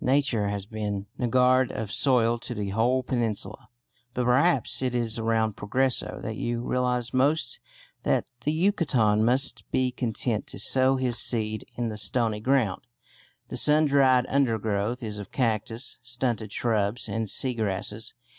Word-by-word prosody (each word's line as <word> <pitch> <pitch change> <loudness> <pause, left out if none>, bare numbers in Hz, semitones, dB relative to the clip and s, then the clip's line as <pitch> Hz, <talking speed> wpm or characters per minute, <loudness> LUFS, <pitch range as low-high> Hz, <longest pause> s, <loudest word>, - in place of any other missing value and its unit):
Nature 130 -6 +2
has 100 -1 -3
been 105 -2 -4
niggard 125 +1 +3
of 105 -2 -5
soil 120 -4 +2
to 120 - -6
the 100 -2 -3
whole 125 +5 +1
peninsula, 110 -6 -3 0.5
but 125 - 0
perhaps 130 +2 +3
it 125 -1 -1
is 115 -1 -1
around 110 -2 0
Progreso 130 +5 -1
that 110 -1 -4
you 120 0 -2
realise 125 -1 -1
most 135 0 +1 0.4
that - - +1 0.2
the 150 - +1
Yucatecan 150 - +2
must 130 +4 0
be 130 -1 +1
content 120 -2 -1
to - - -7
sow 130 0 +3
his 125 -2 +1
seed 110 -3 -1
in 120 -1 -2
the 105 - -6
"stony 110 0 0
ground." 115 -5 +1 0.7
The - - -4
sundried 140 -4 +5
undergrowth 115 -3 0
is 105 -2 -4
of 100 - -9
cactus, 115 0 -2
stunted 120 -3 -3
shrubs, 110 +1 0
and 110 -2 -3
sea 130 +5 +1
grasses. 105 0 -3
120 Hz, 145 wpm, -26 LUFS, 110-130 Hz, 0.7 s, sundried